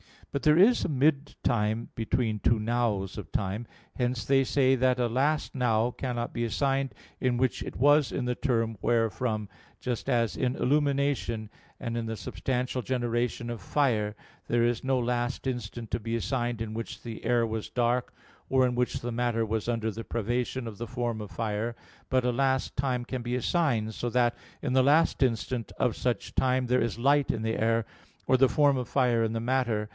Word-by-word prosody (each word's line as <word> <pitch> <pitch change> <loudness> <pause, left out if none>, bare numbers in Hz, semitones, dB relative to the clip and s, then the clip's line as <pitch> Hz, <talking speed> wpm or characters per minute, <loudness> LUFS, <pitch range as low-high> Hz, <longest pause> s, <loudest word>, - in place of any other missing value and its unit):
But 140 - -3
there 150 +1 +5
is 220 +7 +6
a - - -1
mid 145 0 +1
time 110 0 0
between 110 -1 -1
two 115 +3 +3
"nows" 110 -4 -1
of 85 -7 -10
time: 105 +3 -2 0.3
hence 125 -2 0
they 135 0 +3
say 135 0 +3
that 130 0 +2
a 125 -1 +1
last 140 +6 0
"now" 120 -2 +2
cannot 120 -2 -3
be 120 0 -1
assigned 135 +3 0 0.2
in 125 -1 +1
which 130 0 0
it - - -6
was 145 +2 +4
in 125 - -1
the 125 - 0
term 115 -4 0
wherefrom, 115 -1 0 0.3
just 125 -2 -3
as 115 -2 +1
in 125 0 0
illumination, 140 -5 +1 0.3
and 115 0 -3
in 115 - -2
the 110 0 -3
substantial 125 +3 -2
generation 120 -1 -1
of 120 -4 -5
fire, 110 -3 +1 0.3
there 120 0 +2
is 120 0 0
no 135 0 +2
last 120 +1 -1
instant 120 -2 -4
to - - 0
be 115 +1 -3
assigned 120 -1 -1
in 110 -1 -4
which 115 +1 -6
the 115 -2 -7
air 120 -1 +3
was 110 -1 -4
dark, 120 0 0 0.4
or 130 -1 +4
in 125 - +1
which 125 0 -1
the 120 - -3
matter 115 -1 0
was 110 0 -2
under 115 -2 0
the 115 +2 -7
privation 120 +2 -2
of 110 -3 -7
the 120 - -5
form 120 -2 -2
of 105 - -7
fire: 115 +1 -2 0.3
but 130 -1 +2
a 125 - +3
last 130 +1 0
time 130 -2 0
can 130 0 -4
be 120 +1 -2
assigned, 125 -5 +1
so 120 - -3
that 120 0 +2 0.3
in 140 - -2
the 130 - +5
last 145 +5 +3
instant 120 -1 0
of 120 - +2
such 120 -4 -2
time 130 -1 +1
there 125 +1 +3
is 115 -1 -1
light 140 +3 +3
in 115 - -3
the 110 0 -1
air, 115 0 +2 0.4
or 130 - +4
the 130 0 +5
form 145 -2 +4
of 125 -2 -3
fire 125 -4 +2
in 110 0 -1
the 115 - -1
matter. 115 -4 0
120 Hz, 195 wpm, -28 LUFS, 115-130 Hz, 0.4 s, is